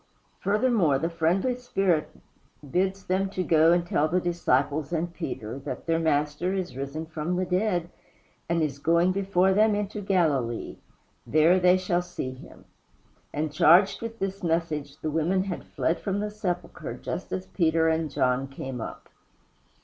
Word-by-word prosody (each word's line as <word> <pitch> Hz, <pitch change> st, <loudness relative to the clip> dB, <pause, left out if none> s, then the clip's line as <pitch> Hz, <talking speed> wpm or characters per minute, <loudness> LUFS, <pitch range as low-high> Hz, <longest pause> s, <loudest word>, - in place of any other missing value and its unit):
Furthermore, 205 Hz, -, +2 dB
the 165 Hz, +5 st, -2 dB
friendly 175 Hz, +9 st, +1 dB
spirit 195 Hz, -10 st, 0 dB, 0.6 s
bids 190 Hz, +6 st, 0 dB
them 190 Hz, +1 st, 0 dB
to 185 Hz, -1 st, -2 dB
go 160 Hz, -1 st, +5 dB
and 175 Hz, 0 st, +2 dB
tell 155 Hz, -3 st, +1 dB
the 180 Hz, +3 st, +1 dB
disciples 155 Hz, -4 st, 0 dB
and 170 Hz, 0 st, -2 dB
Peter 130 Hz, -8 st, -5 dB
that 135 Hz, -, -6 dB
their 165 Hz, -1 st, +1 dB
Master 150 Hz, +3 st, 0 dB
is 180 Hz, -9 st, -3 dB
risen 140 Hz, +4 st, -4 dB
from 160 Hz, +2 st, -3 dB
the 185 Hz, +1 st, 0 dB
dead, 180 Hz, -2 st, 0 dB, 0.6 s
and 165 Hz, -1 st, +2 dB
is 140 Hz, -2 st, -2 dB
going 170 Hz, +4 st, +3 dB
before 190 Hz, -1 st, +2 dB
them 215 Hz, +1 st, +4 dB
into 205 Hz, 0 st, -3 dB
Galilee 150 Hz, -, 0 dB, 0.5 s
there 155 Hz, +3 st, +5 dB, 0.2 s
shall 180 Hz, -1 st, 0 dB
they -, -, -11 dB
see 155 Hz, -7 st, -4 dB
him. 130 Hz, -, -14 dB, 0.7 s
And 150 Hz, 0 st, -2 dB
charged 175 Hz, +6 st, +5 dB
with 230 Hz, 0 st, -6 dB
this 195 Hz, 0 st, -3 dB
message 160 Hz, -4 st, -1 dB
the 155 Hz, -1 st, -3 dB
women 170 Hz, +5 st, +1 dB
had 190 Hz, -3 st, -5 dB
fled 165 Hz, -, -1 dB
from 200 Hz, -1 st, -2 dB
the 210 Hz, 0 st, -3 dB
sepulchre 180 Hz, -4 st, -4 dB
just -, -, -6 dB
as 95 Hz, 0 st, -3 dB
Peter 160 Hz, -, +2 dB
and 160 Hz, -1 st, +1 dB
John 130 Hz, 0 st, +1 dB
came 135 Hz, -2 st, -6 dB
up. -, -, -7 dB
170 Hz, 160 wpm, -26 LUFS, 150-190 Hz, 0.7 s, go